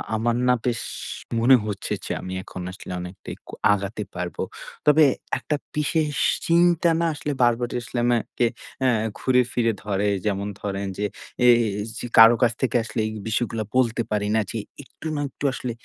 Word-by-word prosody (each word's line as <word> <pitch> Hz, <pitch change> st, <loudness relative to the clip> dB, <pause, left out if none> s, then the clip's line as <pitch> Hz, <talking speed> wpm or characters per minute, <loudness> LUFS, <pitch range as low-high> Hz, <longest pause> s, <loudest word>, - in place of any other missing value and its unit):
আমার 115 Hz, +2 st, +1 dB
না, 125 Hz, -, +6 dB
বেশ 120 Hz, -2 st, 0 dB, 0.6 s
মনে 125 Hz, +3 st, +7 dB
হচ্ছে 100 Hz, -2 st, -4 dB
যে, -, -, -4 dB
আমি 95 Hz, -, -6 dB
এখন 95 Hz, -, -8 dB
আসলে 95 Hz, 0 st, -9 dB
অনেকটাই 90 Hz, +1 st, -8 dB, 0.4 s
আগাতে 100 Hz, +1 st, -3 dB
পারব। 90 Hz, 0 st, -4 dB, 0.5 s
তবে 150 Hz, +1 st, +6 dB, 0.3 s
একটা 150 Hz, -, -2 dB, 0.2 s
বিশেষ 150 Hz, 0 st, 0 dB, 0.3 s
চিন্তা 170 Hz, 0 st, +4 dB
না 170 Hz, -, +1 dB
আসলে 150 Hz, 0 st, -4 dB
বারবার 120 Hz, 0 st, +2 dB
আসলে 120 Hz, -, -7 dB
আমাকে 120 Hz, 0 st, +1 dB, 0.4 s
অ্যা 130 Hz, -, +4 dB, 0.3 s
ঘুরে-ফিরে 125 Hz, -2 st, +2 dB
ধরে। 100 Hz, 0 st, 0 dB, 0.2 s
যেমন 100 Hz, -1 st, -1 dB
ধরেন 100 Hz, -1 st, -3 dB
যে, 105 Hz, -, -1 dB, 0.4 s
এই 120 Hz, -, +8 dB, 0.4 s
যে, -, -, -4 dB
কারও 115 Hz, +1 st, +10 dB
কাছ 120 Hz, -1 st, +4 dB
থেকে 125 Hz, -2 st, 0 dB
আসলে 110 Hz, 0 st, -4 dB
এই 110 Hz, -, -4 dB, 0.2 s
বিষয়গুলো 110 Hz, 0 st, -1 dB
বলতে 120 Hz, -2 st, +2 dB
পারি 105 Hz, -1 st, 0 dB
না -, -, +4 dB
যে -, -, -4 dB, 0.3 s
একটু 150 Hz, -, -10 dB
না 145 Hz, -, -1 dB
একটু -, -, -13 dB
আসলে 125 Hz, -1 st, -4 dB
115 Hz, 165 wpm, -24 LUFS, 105-130 Hz, 0.6 s, কারও